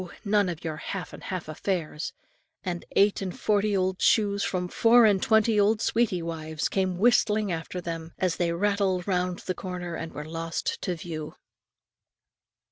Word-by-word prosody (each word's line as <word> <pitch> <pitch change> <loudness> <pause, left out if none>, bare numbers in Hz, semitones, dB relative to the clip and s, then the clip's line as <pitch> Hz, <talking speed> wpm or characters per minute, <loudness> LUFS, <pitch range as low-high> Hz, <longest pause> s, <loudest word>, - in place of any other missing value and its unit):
none 205 -2 +3
of 170 -2 -6
your 160 -2 -3
half 180 +4 -5
and - - -10
half 185 -4 -4
affairs; 155 -1 -3 0.5
and 175 -2 -4
eight 200 0 +4
and 185 -2 -5
forty 205 -1 +2
old 185 0 0
shoes 200 -2 +3
from 180 -1 -1
four 230 +5 +5
and 200 -3 +4
twenty 220 -1 +3
old 210 +2 +3
sweetie 215 -7 +1
wives, 160 -2 -3
came 185 -2 0
whistling 215 -1 +3
after 165 +2 -4
them, 165 -1 -5
as 185 -3 0
they 170 -1 +1
rattled 195 0 0
round 180 -2 0
the 185 - -1
corner 180 -1 -5
and 165 0 -5
were 150 - -7
lost 165 +1 -3
to 180 - -1
view. 160 -2 -6
185 Hz, 165 wpm, -27 LUFS, 170-205 Hz, 0.5 s, four